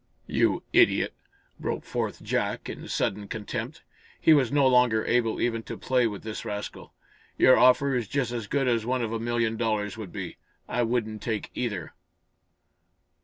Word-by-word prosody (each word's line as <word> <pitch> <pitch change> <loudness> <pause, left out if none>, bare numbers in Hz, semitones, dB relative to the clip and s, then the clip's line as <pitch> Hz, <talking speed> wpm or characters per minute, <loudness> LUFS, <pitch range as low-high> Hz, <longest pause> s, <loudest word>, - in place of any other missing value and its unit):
"You - - +1
idiot!" - - +4 0.5
broke - - -3
forth - - -3
Jack, - - -1
in - - -7
sudden 100 +1 -1
contempt. 115 +7 -5 0.4
He 160 - +6
was 135 -6 +3
no 145 -1 +4
longer 125 -4 +4
able 115 -2 +1
even 115 -1 0
to - - -5
play 125 -2 +2
with 105 -3 -6
this 110 -1 -5
rascal. 105 -2 -6 0.4
"Your 130 - +7
offer 130 +2 +5
is 120 -4 -1
just 135 0 -1
as 115 -4 -4
good 135 +2 0
as 115 -3 +2
one 125 +1 0
of 115 0 -3
a 115 - -1
million 115 -1 0
dollars 110 -3 -1
would 105 -5 -7
be. - - -6 0.3
I 120 - 0
wouldn't 115 -3 -1
take 110 -3 -3
either!" 100 -10 -3
115 Hz, 170 wpm, -27 LUFS, 110-125 Hz, 0.5 s, Your